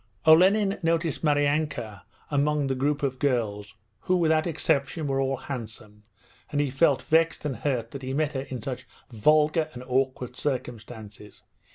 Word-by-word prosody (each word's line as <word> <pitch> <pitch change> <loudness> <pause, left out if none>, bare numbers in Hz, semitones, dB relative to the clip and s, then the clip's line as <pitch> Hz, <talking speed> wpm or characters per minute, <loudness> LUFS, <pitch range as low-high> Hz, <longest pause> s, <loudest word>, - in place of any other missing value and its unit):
Olenin 195 +5 +5
noticed 165 -2 0
Maryanka 145 - 0 0.3
among 145 0 +1
the 135 - 0
group 140 +3 -1
of 130 -2 -1
girls, 110 -6 -1 0.2
who 185 - +1
without 160 -1 +2
exception 155 -1 0
were 135 -1 0
all 135 0 0
handsome, 110 -5 -8 0.5
and 145 - 0
he 145 -2 0
felt 140 0 +2
vexed 165 -1 +2
and 135 -5 -2
hurt 120 -3 -2
that 140 - -7
he 130 0 -4
met 150 +2 0
her 135 - -2
in 130 -4 -7
such 130 -1 -5 0.2
vulgar 150 +7 +3
and 125 - -7
awkward 130 -1 -1
circumstances. 110 -6 -6
140 Hz, 155 wpm, -26 LUFS, 125-155 Hz, 0.5 s, Olenin